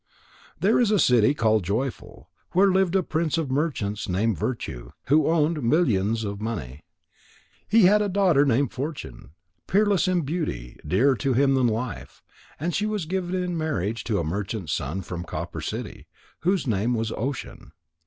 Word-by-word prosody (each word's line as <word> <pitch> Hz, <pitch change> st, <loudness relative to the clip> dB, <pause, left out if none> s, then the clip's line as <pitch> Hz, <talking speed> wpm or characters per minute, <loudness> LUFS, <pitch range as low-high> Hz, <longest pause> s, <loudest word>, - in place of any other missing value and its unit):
There -, -, +3 dB
is 240 Hz, -4 st, +3 dB
a 210 Hz, -, +3 dB
city 125 Hz, -, +4 dB
called 110 Hz, -5 st, +2 dB
Joyful, 110 Hz, -, -4 dB, 0.3 s
where 195 Hz, +2 st, +5 dB
lived 190 Hz, -1 st, +2 dB
a 190 Hz, -, +3 dB
prince 160 Hz, 0 st, -1 dB
of 155 Hz, -5 st, -2 dB
merchants 130 Hz, -10 st, -1 dB
named 105 Hz, +4 st, +1 dB
Virtue, 65 Hz, -, -4 dB, 0.2 s
who 155 Hz, +3 st, +4 dB
owned 160 Hz, -1 st, +1 dB
millions 115 Hz, -, +2 dB
of 100 Hz, -1 st, -5 dB
money. 75 Hz, -, -5 dB, 0.9 s
He 225 Hz, +1 st, +5 dB
had 205 Hz, +3 st, +6 dB
a 205 Hz, -, 0 dB
daughter 185 Hz, -7 st, +3 dB
named 135 Hz, -1 st, +2 dB
Fortune, 145 Hz, -, -6 dB, 0.4 s
peerless 200 Hz, -2 st, +2 dB
in 180 Hz, -1 st, +2 dB
beauty, 140 Hz, -, -4 dB
dearer 115 Hz, -, +3 dB
to 135 Hz, 0 st, 0 dB
him 135 Hz, +2 st, +3 dB
than 130 Hz, -2 st, +3 dB
life. 115 Hz, 0 st, -4 dB, 0.4 s
And 170 Hz, +4 st, -2 dB
she 210 Hz, +5 st, 0 dB
was 210 Hz, -5 st, -2 dB
given 185 Hz, +1 st, -2 dB
in 180 Hz, -1 st, -2 dB
marriage 115 Hz, -, -2 dB
to 110 Hz, -4 st, 0 dB
a 85 Hz, -, 0 dB
merchant's 95 Hz, -, -3 dB
son 85 Hz, +8 st, -3 dB
from 85 Hz, -1 st, -5 dB
Copper 85 Hz, -, -5 dB
City, -, -, -6 dB, 0.3 s
whose 185 Hz, 0 st, +1 dB
name 115 Hz, +1 st, 0 dB
was 110 Hz, -1 st, -2 dB
Ocean. 135 Hz, +3 st, -5 dB
135 Hz, 165 wpm, -25 LUFS, 105-175 Hz, 0.9 s, had